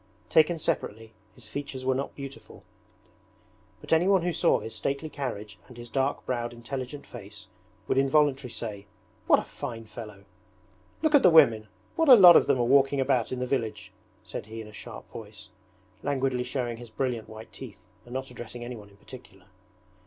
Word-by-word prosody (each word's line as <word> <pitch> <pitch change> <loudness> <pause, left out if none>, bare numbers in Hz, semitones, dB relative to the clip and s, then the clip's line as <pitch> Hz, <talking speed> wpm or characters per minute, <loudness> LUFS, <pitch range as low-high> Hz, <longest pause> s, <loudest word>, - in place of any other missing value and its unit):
Taken 160 +2 +4
separately 110 -7 -3 0.2
his 125 - -12
features 130 +3 -6
were 130 - +3
not 135 +2 -4
beautiful, 140 -1 -10 1.2
but - - -2
anyone 180 +2 +4
who 175 -1 0
saw 170 - +3
his 110 - -7
stately 140 +3 -3
carriage 110 -7 -5
and 125 - -14
his 120 -1 -10
dark 135 0 -1
browed 120 -1 -2
intelligent 130 +3 -6
face - - -11 0.4
would 135 - +2
involuntarily 135 -1 +2
say, 105 -3 -6 0.4
'What - - +7
a - - -2
fine 115 -5 -7
fellow!' 105 -3 -10 0.8
'Look 315 -1 +2
at 290 - +7
the 180 - +7
women, 115 -10 +5 0.3
what 325 -3 +2
a 255 - +12
lot 180 -6 +10
of - - +5
them - - +3
are - - +3
walking 135 +2 +4
about 130 -3 +1
in 130 - -2
the 125 - -2
village,' 110 -7 -3 0.3
said 110 - -7
he 110 +1 -8
in 110 - -8
a 105 - -13
sharp - - -10
voice, - - -11 0.5
languidly 130 -3 -1
showing 125 -2 -3
his 120 0 -11
brilliant 115 -1 -3
white 110 +1 -11
teeth 105 -8 -11 0.2
and 120 +1 -10
not 130 0 -4
addressing 120 0 -8
anyone 115 -4 -8
in 100 - -21
particular. 100 -5 -14
125 Hz, 180 wpm, -27 LUFS, 115-140 Hz, 1.2 s, a